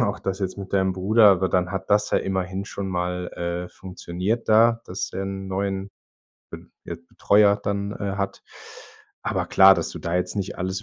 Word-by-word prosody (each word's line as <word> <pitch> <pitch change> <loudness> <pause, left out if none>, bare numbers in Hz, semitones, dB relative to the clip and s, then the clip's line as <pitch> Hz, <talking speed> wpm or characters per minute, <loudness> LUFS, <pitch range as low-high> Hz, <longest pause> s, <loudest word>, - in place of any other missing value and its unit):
auch 105 -3 0
das 95 -1 -3
jetzt 95 -2 -3
mit 100 -1 -8
deinem 95 -1 +2
Bruder, 105 +4 +4
aber 95 -1 +2
dann 90 0 0
hat 95 0 -5
das 105 +1 +3
ja - - +3
immerhin 95 0 -3
schon 100 -1 -5
mal, 90 0 -2
äh, 85 +1 -4
funktioniert 95 +4 -4
da, 115 +1 +5
dass 90 - -5
er 95 - -3
'n 95 0 -5
neuen 95 0 -3 0.6
Be - - -10 0.2
Be - - -6
Betreuer 100 +4 +3
dann, 100 0 -2
äh, 100 -2 -4
hat. 100 -1 -4 0.8
Aber - - -2
klar, 95 0 +7
dass - - -3
du - - -8
da 85 +1 -2
jetzt 90 0 -2
nicht 100 -2 -4
alles 95 +1 -3
95 Hz, 195 wpm, -23 LUFS, 90-100 Hz, 0.8 s, klar